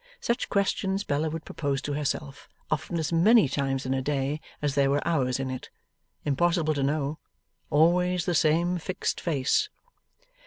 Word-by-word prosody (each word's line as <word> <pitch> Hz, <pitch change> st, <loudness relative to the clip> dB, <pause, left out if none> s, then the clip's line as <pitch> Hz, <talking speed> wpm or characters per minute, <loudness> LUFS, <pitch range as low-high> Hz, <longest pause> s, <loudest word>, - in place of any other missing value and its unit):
Such 235 Hz, +2 st, -1 dB
questions 195 Hz, 0 st, 0 dB
Bella 150 Hz, 0 st, 0 dB
would 160 Hz, +1 st, -6 dB
propose 140 Hz, -3 st, -2 dB
to 145 Hz, -, -2 dB
herself, 145 Hz, -1 st, -3 dB, 0.2 s
often 155 Hz, +3 st, -1 dB
as 160 Hz, 0 st, -2 dB
many 200 Hz, +2 st, +6 dB
times 135 Hz, -1 st, -1 dB
in 130 Hz, -, 0 dB
a 135 Hz, -, 0 dB
day 145 Hz, +2 st, -1 dB, 0.2 s
as 145 Hz, -2 st, -1 dB
there 140 Hz, -1 st, +3 dB
were 145 Hz, +3 st, 0 dB
hours 135 Hz, -6 st, +1 dB
in 135 Hz, -1 st, -2 dB
it. 130 Hz, -, -6 dB, 0.6 s
Impossible 155 Hz, +2 st, +2 dB
to 145 Hz, -, -2 dB
know. 145 Hz, +2 st, -1 dB, 0.5 s
Always 175 Hz, +4 st, +3 dB
the 175 Hz, -, 0 dB
same 170 Hz, +3 st, +2 dB
fixed 185 Hz, +4 st, -3 dB
face. 160 Hz, -, +1 dB
150 Hz, 160 wpm, -27 LUFS, 140-175 Hz, 0.6 s, many